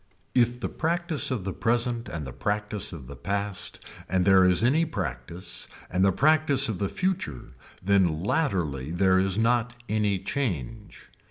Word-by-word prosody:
If 120 Hz, -1 st, +2 dB
the -, -, -2 dB
practice 170 Hz, -1 st, 0 dB
of 125 Hz, -8 st, -2 dB
the 95 Hz, 0 st, -3 dB
present 120 Hz, +2 st, 0 dB
and 80 Hz, -3 st, -5 dB
the 65 Hz, -, -7 dB
practice 105 Hz, -, -2 dB
of 80 Hz, -7 st, -9 dB
the 70 Hz, +3 st, -9 dB
past 100 Hz, +3 st, -3 dB, 0.3 s
and 95 Hz, 0 st, +2 dB
there 95 Hz, -1 st, +6 dB
is 90 Hz, +3 st, +3 dB
any 145 Hz, +7 st, +4 dB
practice 85 Hz, -, -5 dB, 0.2 s
and 90 Hz, +1 st, +2 dB
the 95 Hz, -, +5 dB
practice 145 Hz, +2 st, +3 dB
of 105 Hz, -6 st, -3 dB
the 100 Hz, -, -1 dB
future 175 Hz, -, -3 dB, 0.3 s
then 90 Hz, -5 st, +2 dB
latterly 90 Hz, -, 0 dB
there 95 Hz, +2 st, +3 dB
is 95 Hz, +1 st, +1 dB
not 120 Hz, +1 st, +1 dB
any 105 Hz, -2 st, +1 dB
change. 100 Hz, -, -4 dB
100 Hz, 160 wpm, -26 LUFS, 90-120 Hz, 0.3 s, there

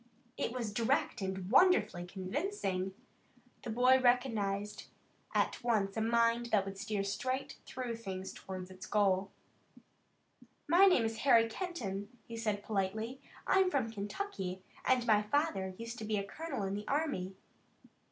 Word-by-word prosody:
It -, -, -2 dB
was 235 Hz, -4 st, -3 dB
direct 235 Hz, +1 st, +1 dB
and 190 Hz, 0 st, -3 dB
wonderfully 265 Hz, -, +4 dB
convincing. 190 Hz, -, -2 dB, 0.7 s
The -, -, -6 dB
boy 250 Hz, +3 st, +5 dB
recognized 220 Hz, -5 st, +1 dB, 0.5 s
at -, -, +1 dB
once 210 Hz, -5 st, +1 dB
a 220 Hz, -, 0 dB
mind 230 Hz, +1 st, +2 dB
that 210 Hz, -4 st, +2 dB
would 195 Hz, 0 st, -6 dB
steer 205 Hz, -1 st, -1 dB
straight 255 Hz, +7 st, -3 dB
through 245 Hz, -3 st, -4 dB
things 190 Hz, -4 st, -6 dB
toward 185 Hz, -1 st, -7 dB
its 185 Hz, +2 st, -9 dB
goal. 195 Hz, -2 st, +2 dB, 1.4 s
"My 355 Hz, +6 st, +7 dB
name 265 Hz, -12 st, +4 dB
is 225 Hz, 0 st, -2 dB
Harry 235 Hz, -5 st, +5 dB
Kenton," 220 Hz, -, -4 dB, 0.2 s
he 230 Hz, -, -8 dB
said 215 Hz, -3 st, -1 dB
politely. 220 Hz, +5 st, -2 dB, 0.2 s
"I'm 380 Hz, -1 st, +4 dB
from 255 Hz, -9 st, 0 dB
Kentucky, 200 Hz, -, -4 dB, 0.2 s
and 255 Hz, -2 st, +3 dB
my 215 Hz, -3 st, +5 dB
father 210 Hz, -6 st, 0 dB
used 230 Hz, +1 st, -6 dB
to -, -, -5 dB
be 215 Hz, 0 st, 0 dB
a 200 Hz, -, -1 dB
colonel 280 Hz, +2 st, -4 dB
in 195 Hz, 0 st, -2 dB
the 205 Hz, +1 st, -5 dB
army." 275 Hz, -11 st, -1 dB
220 Hz, 145 wpm, -33 LUFS, 195-255 Hz, 1.4 s, My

